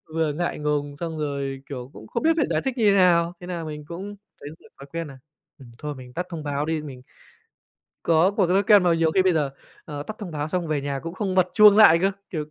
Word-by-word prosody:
vừa 160 Hz, -2 st, 0 dB
ngại 175 Hz, +2 st, -3 dB
ngùng, 145 Hz, -1 st, -2 dB
xong 160 Hz, 0 st, -5 dB
rồi, 140 Hz, -2 st, -3 dB
kiểu, 130 Hz, -2 st, -7 dB
cũng 110 Hz, -, -12 dB
không -, -, -3 dB
biết 325 Hz, +1 st, +4 dB
phải -, -, +3 dB
giải -, -, 0 dB
thích 265 Hz, -1 st, -2 dB
như 220 Hz, -, +2 dB
thế 200 Hz, -, +3 dB
nào. 175 Hz, -2 st, +4 dB
Thế 180 Hz, -, -10 dB
nà 175 Hz, -2 st, -4 dB
mình 150 Hz, -1 st, -7 dB
cũng 190 Hz, +5 st, -7 dB, 0.3 s
thấy 145 Hz, -, -7 dB
được -, -, -19 dB
thói 140 Hz, -, -11 dB
quen 165 Hz, -1 st, -3 dB
nà, 135 Hz, -2 st, -12 dB, 0.4 s
ừm, 125 Hz, -3 st, -14 dB
thôi 150 Hz, -1 st, -6 dB
mình 125 Hz, -1 st, -12 dB
tắt 180 Hz, -, -3 dB
thông 165 Hz, -4 st, -6 dB
báo 145 Hz, 0 st, -2 dB
đi, 160 Hz, -1 st, -2 dB
mình 135 Hz, -4 st, -9 dB, 1.0 s
có 165 Hz, +3 st, +3 dB
cột 200 Hz, -3 st, +1 dB
thói 190 Hz, +3 st, +3 dB
ken 205 Hz, -1 st, +6 dB
mà 175 Hz, -2 st, +3 dB
nhiều 165 Hz, -1 st, +2 dB
khi 190 Hz, -, +4 dB
bây 185 Hz, -1 st, +3 dB
giờ, 150 Hz, -4 st, 0 dB, 0.3 s
ờ, 145 Hz, -1 st, -6 dB
tắt 215 Hz, +7 st, -8 dB
thông 205 Hz, -5 st, -7 dB
báo 150 Hz, -1 st, -3 dB
xong 180 Hz, +1 st, -2 dB
về 150 Hz, -2 st, 0 dB
nhà 140 Hz, -1 st, -3 dB
cũng 165 Hz, +1 st, -6 dB
không 190 Hz, -1 st, -2 dB
bật 185 Hz, -1 st, +3 dB
chuông 210 Hz, -1 st, +7 dB
lại 210 Hz, -7 st, +8 dB
cơ, 195 Hz, -, +2 dB, 0.2 s
kiểu, 155 Hz, -4 st, -3 dB
165 Hz, 265 wpm, -24 LUFS, 145-185 Hz, 1.0 s, lại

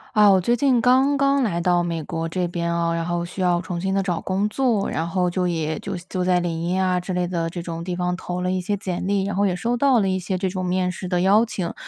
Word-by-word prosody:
啊， 210 Hz, -1 st, +7 dB
我 190 Hz, -1 st, +5 dB
最 235 Hz, +7 st, +1 dB
近 255 Hz, 0 st, +3 dB
刚 260 Hz, +4 st, +4 dB
刚 275 Hz, 0 st, +2 dB
来 185 Hz, -8 st, 0 dB
到 175 Hz, 0 st, +2 dB
美 170 Hz, -2 st, -3 dB
国 165 Hz, +1 st, -4 dB
这 180 Hz, +1 st, -1 dB
边 170 Hz, 0 st, -2 dB
哦， 170 Hz, 0 st, 0 dB
然 165 Hz, 0 st, -1 dB
后 175 Hz, 0 st, -2 dB
需 180 Hz, +2 st, -6 dB
要 175 Hz, -1 st, +2 dB
重 175 Hz, -2 st, -4 dB
新 190 Hz, 0 st, -1 dB
地 195 Hz, -, +1 dB
找 180 Hz, -3 st, -2 dB
工 195 Hz, +2 st, 0 dB
作， 225 Hz, -2 st, 0 dB
然 165 Hz, +1 st, -2 dB
后 180 Hz, +1 st, 0 dB
就 180 Hz, +1 st, 0 dB
也 160 Hz, -2 st, -2 dB
就 195 Hz, -2 st, -5 dB
就 185 Hz, -1 st, -2 dB
在 180 Hz, 0 st, +3 dB
领 170 Hz, -2 st, -2 dB
英 180 Hz, +2 st, -1 dB
啊 185 Hz, -1 st, +1 dB
之 180 Hz, +1 st, -5 dB
类 180 Hz, 0 st, 0 dB
的 170 Hz, -2 st, -2 dB
这 175 Hz, 0 st, -6 dB
种 165 Hz, -1 st, -5 dB
地 180 Hz, 0 st, -3 dB
方 180 Hz, 0 st, -1 dB
投 180 Hz, -1 st, -5 dB
了 180 Hz, 0 st, 0 dB
一 185 Hz, 0 st, -1 dB
些 205 Hz, +3 st, -2 dB
简 185 Hz, -1 st, -4 dB
历， 200 Hz, -1 st, +1 dB
然 200 Hz, 0 st, -3 dB
后 200 Hz, +1 st, +2 dB
也 180 Hz, -, 0 dB
收 235 Hz, +6 st, -1 dB
到 260 Hz, -1 st, +3 dB
了 195 Hz, -, +1 dB
一 185 Hz, 0 st, 0 dB
些 185 Hz, +1 st, -2 dB
这 190 Hz, +1 st, -1 dB
种 185 Hz, 0 st, -3 dB
面 180 Hz, 0 st, 0 dB
试 180 Hz, +1 st, -6 dB
的 180 Hz, -1 st, 0 dB
邀 200 Hz, +4 st, +5 dB
请。 185 Hz, -7 st, -3 dB
180 Hz, 310 characters per minute, -22 LUFS, 175-195 Hz, -, 啊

